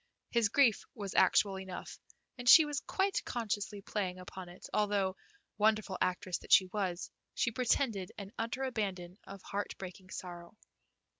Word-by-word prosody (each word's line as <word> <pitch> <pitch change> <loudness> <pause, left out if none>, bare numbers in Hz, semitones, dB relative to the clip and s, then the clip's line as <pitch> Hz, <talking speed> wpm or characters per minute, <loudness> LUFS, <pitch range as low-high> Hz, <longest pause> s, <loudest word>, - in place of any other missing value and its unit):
His 235 -3 +3
grief 240 -2 +4
was 200 -3 -5
actual 195 -2 +4
enough, 190 -1 -7 0.4
and 245 -1 0
she 315 - +10
was 295 -2 -2
quite 390 0 0
consciously 205 -3 -3
playing 190 -4 -2
upon 180 0 -9
it, 175 - -11
although, 200 -2 +1 0.4
wonderful 215 -2 +2
actress 185 -1 0
that - - -13
she 190 - +8
was, 185 -2 -3 0.2
she 230 - +1
pretended 225 -5 0
an 200 -1 -7
utter 230 +4 -3
abandon 195 -7 -3
of 195 -1 -10
heart 205 +1 -4
breaking 185 0 -9
sorrow. 175 +1 -8
200 Hz, 150 wpm, -33 LUFS, 185-225 Hz, 0.4 s, she